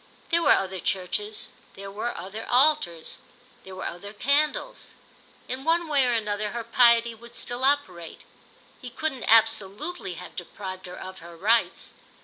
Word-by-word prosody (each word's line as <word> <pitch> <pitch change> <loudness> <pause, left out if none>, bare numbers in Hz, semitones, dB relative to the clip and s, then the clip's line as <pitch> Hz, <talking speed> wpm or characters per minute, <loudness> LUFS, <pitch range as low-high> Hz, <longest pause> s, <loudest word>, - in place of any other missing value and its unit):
There 340 0 +3
were - - +6
other 190 -1 -1
churches, 200 +4 -2 0.2
there 195 0 -8
were 215 +4 -3
other 195 +6 -6
altars, 250 - +2 0.4
there 190 0 -10
were 185 - -6
other 200 +4 -6
candles; 285 +7 0 0.5
in 260 +1 -4
one 335 +2 +2
way 280 -4 +3
or - - +2
another 210 -2 -1
her 235 -1 -3
piety 235 -1 +5
would 235 +1 -15
still 245 +1 -4
operate; 190 - 0 0.6
he 250 - -6
couldn't 265 0 -3
absolutely 225 - +2
have - - -10
deprived 185 +1 -7
her 180 - -9
of 185 0 -8
her 170 0 -12
rites. 225 +6 +1
225 Hz, 150 wpm, -26 LUFS, 190-255 Hz, 0.6 s, were